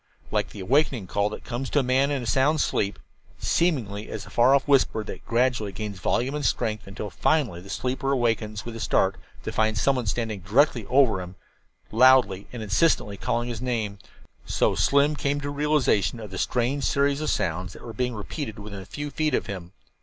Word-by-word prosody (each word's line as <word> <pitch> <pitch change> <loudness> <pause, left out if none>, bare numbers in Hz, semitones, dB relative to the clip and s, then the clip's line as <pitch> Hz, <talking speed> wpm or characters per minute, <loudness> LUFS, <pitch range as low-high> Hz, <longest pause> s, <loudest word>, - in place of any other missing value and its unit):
Like - - 0
the 100 - -9
awakening 130 0 +1
call 100 +3 0
that 105 - -8
comes 125 +2 -4
to - - -1
a - - +1
man 130 +2 +2
in 140 -3 -1
a - - -5
sound 135 +8 +2
sleep 100 -7 0 0.4
seemingly 115 - 0
as - - -6
a - - -13
far 125 +3 +5
off 140 - 0
whisper 135 -6 +3
that - - -8
gradually 115 -3 +1
gathers 100 0 -6
volume 125 +8 0
and 150 0 -3
strength 110 -6 -1
until 100 +1 -6
finally 125 - +1
the 100 - -13
sleeper 130 +4 -2
awakes 110 -5 0
with 120 -1 -6
a - - -6
start 95 -3 +1 0.3
to - - -4
find 110 0 +1
someone 125 -1 +1
standing 110 -1 -2
directly 115 - +2
over 125 -7 +3
him, 90 +1 -9 0.6
loudly 120 -5 +5
and 120 -3 -6
insistently 105 - +2
calling 120 +5 -1
his 120 -2 -5
name 110 -5 -2 0.4
so - - +1
Slim 140 +2 +3
came 145 0 -1
to 145 0 -4
a - - -3
realization 145 -7 +1
of 105 -3 -8
the 95 - -5
strange 130 +3 0
series 140 +1 +1
of 155 - -1
sounds 90 +1 -1
that - - -13
were 115 - -7
being 125 +2 -2
repeated 110 +2 -5
within 100 -1 -8
a 95 - -9
few 145 0 -5
feet 155 -3 0
of - - -1
him. 90 -3 -7
120 Hz, 205 wpm, -25 LUFS, 105-140 Hz, 0.6 s, far